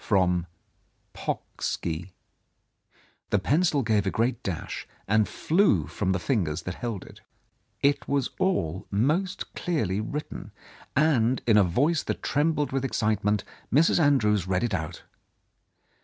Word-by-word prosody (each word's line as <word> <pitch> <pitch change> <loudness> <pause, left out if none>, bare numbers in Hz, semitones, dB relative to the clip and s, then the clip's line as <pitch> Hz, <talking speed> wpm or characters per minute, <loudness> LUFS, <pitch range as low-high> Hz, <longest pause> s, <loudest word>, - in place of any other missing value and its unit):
From 90 -4 +2 0.7
Pocksky." 85 +2 -4 1.2
The - - +3
pencil 145 - +2
gave 105 -3 +1
a - - +3
great 115 +4 0
dash 90 -4 -5 0.2
and 110 +1 +3
flew 160 - +2
from 95 +5 -2
the 95 - +1
fingers 90 - -1
that 90 - -4
held 115 -2 -4
it. - - -14 0.6
It 140 +1 +2
was 140 -2 0
all 95 - 0
most 155 - 0
clearly 110 - -1
written, 150 +7 -6 0.4
and 130 -5 +3
in 115 - +4
a 105 - +7
voice 140 - +2
that - - -4
trembled 150 0 +1
with 135 0 -1
excitement, 105 -5 +1 0.3
Mrs. 155 +6 +4
Andrews 105 - +3
read 95 +1 +1
it 120 -4 -1
out. 85 -1 -4
110 Hz, 130 wpm, -27 LUFS, 95-145 Hz, 1.2 s, a